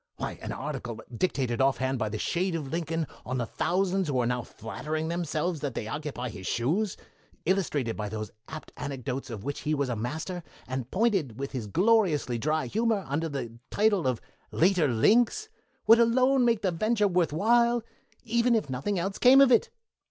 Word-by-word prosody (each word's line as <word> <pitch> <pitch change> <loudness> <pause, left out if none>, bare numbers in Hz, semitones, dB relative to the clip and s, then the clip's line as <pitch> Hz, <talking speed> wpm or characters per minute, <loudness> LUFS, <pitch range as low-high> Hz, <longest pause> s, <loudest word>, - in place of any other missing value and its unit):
Why, - - -5
an - - -5
article 130 -5 -5 0.2
dictated 130 -5 0
off 135 0 +3
hand 130 0 -1
by 110 - -1
the 110 - -4
shade 175 - -1
of 150 -5 -4
Lincoln 165 -1 -1 0.2
on 130 +1 -3
the 120 - -1
thousands 185 +7 0
who 135 -3 0
are 120 - +2
now 125 +1 0
flattering 155 +9 -5
themselves 170 0 -1
that 140 -5 -4
they - - -3
occupy 130 -1 -4
his 95 -4 -8
shoes, 170 - 0 0.5
illustrated 150 - 0
with 105 -1 -2
those 110 0 -5 0.2
apt 155 -1 -8
anecdotes 135 -2 -4
of 110 -4 -6
which 140 +2 -3
he 155 +1 -1
was 140 -2 -1
a 120 - -1
master, 155 - -4 0.3
and 130 -1 -4
pointed 190 - +1
with 140 +1 -4
his 120 -5 -4
gloriously 170 - +2
dry 155 +5 0
humor, 220 -2 0
under 160 +4 -1
the 120 -5 -5
title 205 -7 +2
of 125 -3 0 0.3
'Later 175 -2 +3
Links', 235 - +3 0.4
would 225 +2 +7
alone 255 +2 +4
make 230 -3 +2
the 190 - +2
venture 210 +4 +1
worth 180 -4 +1
while, 235 +7 +3 0.4
even 235 +1 +2
if 210 -12 -1
nothing 145 +11 -2
else 195 +3 -2
came 260 +2 +7
of 275 -2 +7
it." 235 - +4
155 Hz, 185 wpm, -28 LUFS, 130-200 Hz, 0.5 s, would